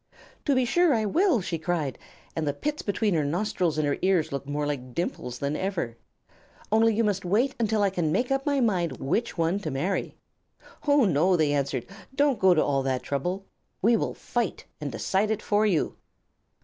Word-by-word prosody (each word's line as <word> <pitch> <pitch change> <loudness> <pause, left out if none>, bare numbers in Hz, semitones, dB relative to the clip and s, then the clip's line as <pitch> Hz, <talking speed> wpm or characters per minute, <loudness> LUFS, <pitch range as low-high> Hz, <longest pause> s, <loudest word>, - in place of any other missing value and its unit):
"To 280 - +3
be 255 -1 +3
sure 335 +3 +3
I 220 -1 0
will," 325 - +3
she 170 -2 -3
cried, 160 -5 -2 0.4
and 160 -2 -1
the 145 - 0
pits 300 - -3
between 205 0 0
her 155 -3 +2
nostrils 170 +1 0
and 155 - +1
her 145 - 0
ears 185 -4 +2
looked 140 0 -4
more 145 +1 -1
like 130 -4 -4
dimples 125 -7 -3
than 140 +3 -2
ever. 170 -11 -2 0.8
"Only 225 0 +4
you 230 - +2
must 200 -3 0
wait 225 +10 +2
until 220 -2 +1
I 200 - +2
can 170 -5 0
make 245 +10 0
up 270 0 +1
my 285 -2 +1
mind 185 -8 +1
which 215 - -1
one 170 +4 +1
to 165 - -4
marry." 150 +8 -2 0.7
"Oh, 285 -3 +5
no," 180 +1 +3
they 150 -3 +2
answered, 140 -3 -1 0.3
"don't 285 -2 +2
go 190 -2 +5
to 155 - +3
all 140 -1 +1
that 130 -1 -1
trouble. 180 +8 -2 0.4
We 230 +3 +5
will - - -1
fight 240 -6 -3 0.2
and 145 -2 -3
decide 190 - 0
it 220 -1 -1
for 210 +1 +2
you." 175 -7 0
185 Hz, 200 wpm, -26 LUFS, 150-220 Hz, 0.8 s, Oh